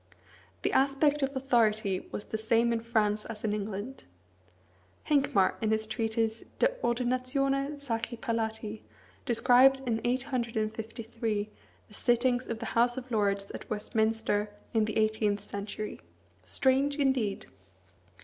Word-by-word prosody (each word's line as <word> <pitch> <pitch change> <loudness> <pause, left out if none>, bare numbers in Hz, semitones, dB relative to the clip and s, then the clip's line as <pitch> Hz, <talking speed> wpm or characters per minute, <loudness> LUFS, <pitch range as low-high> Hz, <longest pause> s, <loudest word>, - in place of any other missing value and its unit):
The - - +1
aspect 280 +2 +3
of 270 0 -1
authority 220 -7 +1
was 205 - -4
the 220 - -3
same 230 +1 +2
in 230 - 0
France 215 -2 +1
as 220 -2 -8
in 210 -2 0
England. 210 +5 -5 1.0
Hincmar, 270 -10 +2
in 220 - +1
his 220 0 +1
treatise, 225 0 -1
"De - - +4
Ordinatione 270 +4 0
Sacri 235 -3 -3
Palatii," 220 -2 -3 0.5
described 255 +3 +5
in 225 -1 0
853 230 -3 -2 0.4
the - - -18
sittings 245 +2 +1
of 230 - -3
the 230 - -6
House 240 +1 +3
of 255 -1 -7
Lords 200 -2 0
at - - -9
Westminster 220 0 0 0.2
in 220 -2 +3
the 215 - -3
eighteenth 215 -1 +2
century. 205 +1 -6 0.4
Strange, 265 - +2
indeed! 265 -8 0
230 Hz, 125 wpm, -30 LUFS, 215-255 Hz, 1.0 s, described